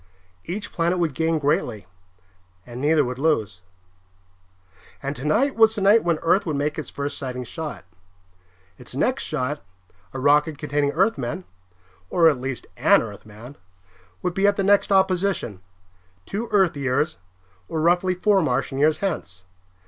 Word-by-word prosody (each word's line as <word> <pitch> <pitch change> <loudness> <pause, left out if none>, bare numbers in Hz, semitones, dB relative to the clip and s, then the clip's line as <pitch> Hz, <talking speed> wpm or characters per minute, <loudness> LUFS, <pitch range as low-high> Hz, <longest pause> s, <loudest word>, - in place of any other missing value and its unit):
Each 195 +5 -5
planet 170 +1 0
would 165 -5 0
gain 160 +3 0
greatly, 125 -8 -1 0.8
and 125 +1 -8
neither 150 0 +3
would 125 +1 -5
lose. 110 - 0 1.4
And 140 +1 -3
tonight 215 - +1
was 225 -1 +5
the 210 - -3
night 205 +4 +5
when 170 -2 +1
Earth 185 +5 +3
would 155 - -1
make 145 +2 -1
its 155 - -6
first 140 0 -4
sighting 125 -2 -4
shot. 155 - -7 0.9
Its 125 0 -9
next 255 - 0
shot, 145 +4 -3 0.5
a 130 - -6
rocket 150 +2 +3
containing 145 -1 0
Earthmen, 180 - 0 0.6
or 170 -2 +4
at 145 -5 +3
least 130 -1 -5
an - - +4
Earthman, 110 +4 -11 0.7
would 180 - -1
be 195 +2 +2
at 205 - +3
the 195 - -1
next 200 +1 +3
opposition, 190 - +1 0.6
two 220 +4 -4
Earth 190 -6 +3
years, 140 +3 -1 0.5
or 160 - -3
roughly 180 +3 +2
four 195 +1 +3
Martian 135 -2 -1
years, 155 +2 +3
hence. 90 - -4
155 Hz, 150 wpm, -23 LUFS, 135-185 Hz, 1.4 s, was